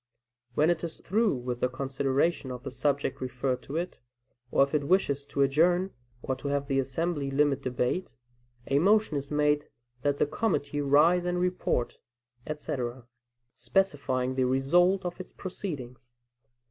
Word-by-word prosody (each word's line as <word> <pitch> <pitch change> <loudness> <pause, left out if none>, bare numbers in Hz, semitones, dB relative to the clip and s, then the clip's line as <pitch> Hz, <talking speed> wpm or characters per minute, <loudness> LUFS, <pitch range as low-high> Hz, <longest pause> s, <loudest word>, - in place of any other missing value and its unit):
When 155 +3 +4
it 170 -1 -2
is 165 -1 -5
through 215 -2 +1
with 125 -1 -4
the 125 - +1
consideration 135 +3 0
of 125 0 -6
the 135 - -5
subject 140 0 -1
referred 130 0 -2
to 140 - -8
it, 175 +2 -4 0.5
or 135 - +4
if 140 - -3
it 145 -2 +1
wishes 145 -7 +2
to 140 -1 +1
adjourn, 175 +7 +3 0.3
or 130 - -1
to - - -6
have 140 0 0
the 135 -1 +1
assembly 140 +2 -1
limit 140 0 +2
debate, 125 +4 -2 0.5
a 140 +1 +2
motion 210 0 +3
is 140 0 -3
made 150 0 +1 0.3
that 145 +2 +1
"the - - +3
committee 145 -5 -1
rise 150 +6 +4
and 180 0 0
report," 180 -9 -1 0.5
etc., 130 -5 -4 0.5
specifying 140 -9 0
the 130 -1 +1
result 175 +9 +3
of 175 +1 -4
its 185 - -8
proceedings. 130 -10 -7
140 Hz, 155 wpm, -28 LUFS, 130-175 Hz, 0.5 s, When